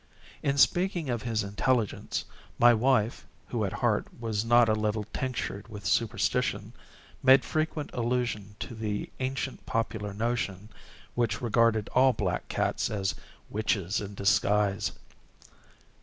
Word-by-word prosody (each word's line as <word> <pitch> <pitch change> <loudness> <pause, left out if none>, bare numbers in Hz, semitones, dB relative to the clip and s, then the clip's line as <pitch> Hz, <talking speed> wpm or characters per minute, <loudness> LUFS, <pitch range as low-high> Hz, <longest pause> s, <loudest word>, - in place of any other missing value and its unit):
In 140 0 0
speaking 175 -1 +3
of 120 -2 -2
his 115 -3 -1
intelligence, 105 +2 -1 0.3
my 120 0 +7
wife, 120 -1 +2 0.3
who 115 -3 -1
at 95 - -2
heart 110 -3 +2
was 110 -3 -1
not 120 0 +5
a 110 - +3
little 105 0 0
tinctured 125 -6 -3
with 105 -4 -9
superstition, 115 -1 0 0.5
made 130 0 +6
frequent 155 -1 -2
allusion 120 -4 -1
to 120 - -5
the 105 -2 -3
ancient 130 0 -3
popular 110 -2 -2
notion, 105 -2 -2 0.4
which 115 -3 0
regarded 115 -2 +2
all 130 0 +4
black 90 -5 -2
cats - - 0
as 95 -3 -1 0.4
witches 100 -3 0
in 100 0 -7
disguise. 100 0 +2
115 Hz, 125 wpm, -28 LUFS, 105-125 Hz, 0.5 s, my